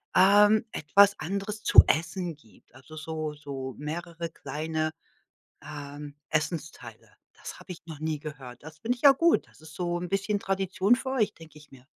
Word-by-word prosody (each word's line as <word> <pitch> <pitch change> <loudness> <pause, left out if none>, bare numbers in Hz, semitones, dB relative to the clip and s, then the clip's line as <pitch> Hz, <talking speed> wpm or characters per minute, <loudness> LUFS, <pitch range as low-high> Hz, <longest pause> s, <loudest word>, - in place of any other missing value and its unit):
ähm, 205 +3 +6
etwas 200 +6 +4
anderes 200 +4 -4
zu - - +8
essen 170 +1 -1
gibt. 115 -6 -24
Also 130 +4 -13
so 155 -1 -4
so 135 -3 -7
mehrere 170 +2 -5
kleine, 155 0 -3 0.8
ähm, 145 0 -8 0.2
Essensteile. 155 -7 -4 0.2
Das - - -10
habe - - -8
ich 170 - -11
noch 155 -3 -9
nie 155 -1 -2
gehört. 135 -5 -9
Das 160 +1 -11
finde 240 +9 -1
ich 245 - -19
ja 280 - +9
gut. 335 +5 +2
Das - - -22
ist 155 -1 -13
so 175 +1 -2
'n 175 0 -5
bisschen 195 +1 0
Tradition 195 +3 +1
für 260 +1 -5
euch, 230 -6 +1
denke 160 -2 -15
ich 150 -1 -18
mir. 130 -1 -16
160 Hz, 175 wpm, -27 LUFS, 150-195 Hz, 0.8 s, ja